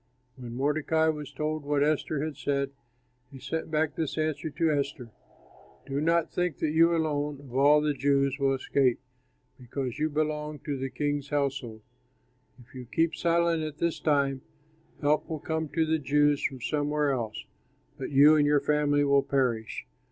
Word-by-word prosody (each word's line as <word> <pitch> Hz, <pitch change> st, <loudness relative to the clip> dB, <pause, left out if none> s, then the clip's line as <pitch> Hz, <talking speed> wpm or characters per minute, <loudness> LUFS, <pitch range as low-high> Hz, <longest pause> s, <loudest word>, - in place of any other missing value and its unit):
When 120 Hz, -3 st, -8 dB
Mordecai 155 Hz, +4 st, +1 dB
was 150 Hz, -3 st, -4 dB
told 155 Hz, 0 st, -3 dB
what 145 Hz, 0 st, +1 dB
Esther 150 Hz, -1 st, 0 dB
had 155 Hz, -2 st, -5 dB
said, 140 Hz, -1 st, -1 dB, 0.6 s
he 140 Hz, -, -11 dB
sent 140 Hz, +6 st, -4 dB
back 155 Hz, 0 st, 0 dB
this 160 Hz, -2 st, -3 dB
answer 155 Hz, 0 st, -1 dB
to 160 Hz, +1 st, 0 dB
Esther, 140 Hz, -5 st, -3 dB, 0.7 s
"Do 140 Hz, +1 st, -2 dB
not 165 Hz, +1 st, +1 dB
think 180 Hz, -4 st, -1 dB
that 155 Hz, -, -1 dB
you 165 Hz, +2 st, +4 dB
alone 150 Hz, -3 st, -1 dB
of 135 Hz, -4 st, -13 dB
all 145 Hz, +2 st, +5 dB
the 150 Hz, -1 st, +1 dB
Jews 140 Hz, 0 st, +1 dB
will 135 Hz, -1 st, +2 dB
escape 130 Hz, -1 st, +1 dB, 0.6 s
because 125 Hz, +1 st, -5 dB
you 155 Hz, +1 st, +1 dB
belong 150 Hz, 0 st, -2 dB
to 145 Hz, -3 st, -2 dB
the 135 Hz, 0 st, -3 dB
king's 145 Hz, +2 st, -2 dB
household. 135 Hz, -6 st, -2 dB, 0.8 s
If 125 Hz, 0 st, -18 dB
you 130 Hz, -1 st, -8 dB
keep 165 Hz, 0 st, +1 dB
silent 170 Hz, -1 st, +1 dB
at 155 Hz, -2 st, -5 dB
this 170 Hz, -1 st, -1 dB
time, 140 Hz, -3 st, +1 dB, 0.6 s
help 150 Hz, +1 st, +1 dB
will 160 Hz, -, -2 dB
come 160 Hz, +1 st, -3 dB
to 160 Hz, +1 st, +1 dB
the 160 Hz, 0 st, +1 dB
Jews 145 Hz, 0 st, +2 dB
from 130 Hz, -2 st, -2 dB
somewhere 150 Hz, +1 st, 0 dB
else, 115 Hz, -5 st, -4 dB, 0.5 s
but -, -, -4 dB
you 145 Hz, +2 st, +7 dB
and 150 Hz, -1 st, +4 dB
your 145 Hz, 0 st, +4 dB
family 145 Hz, 0 st, +2 dB
will 140 Hz, -1 st, +4 dB
perish. 125 Hz, -6 st, -1 dB
145 Hz, 170 wpm, -28 LUFS, 140-155 Hz, 0.8 s, you